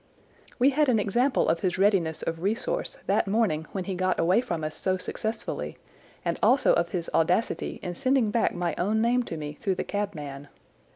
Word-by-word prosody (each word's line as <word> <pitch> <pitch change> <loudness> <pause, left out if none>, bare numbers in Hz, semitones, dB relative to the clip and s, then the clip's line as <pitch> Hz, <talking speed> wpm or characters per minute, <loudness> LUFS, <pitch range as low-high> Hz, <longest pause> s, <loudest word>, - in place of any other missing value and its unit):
"We 265 +3 +4
had 295 0 +2
an 235 - +4
example 240 +6 +2
of 165 - +2
his 185 -2 -1
readiness 185 -5 +2
of 165 0 -3
resource 235 - -1
that - - +1
morning 195 -7 +1
when 190 - -3
he 190 - -4
got 185 0 0
away 180 +7 +4
from 170 -9 -4
us 155 0 -3
so 185 -1 0
successfully, 220 +4 -4 0.5
and - - -1
also - - +5
of - - +1
his 175 -4 -3
audacity 175 +7 +1
in 175 - -3
sending 255 0 +1
back 230 - +1
my 175 -1 -1
own 210 +5 +1
name 240 +2 +3
to 170 -9 -5
me 150 -1 -5
through 195 -4 0
the - - -2
cabman. 150 -9 -4
195 Hz, 190 wpm, -27 LUFS, 170-230 Hz, 0.5 s, also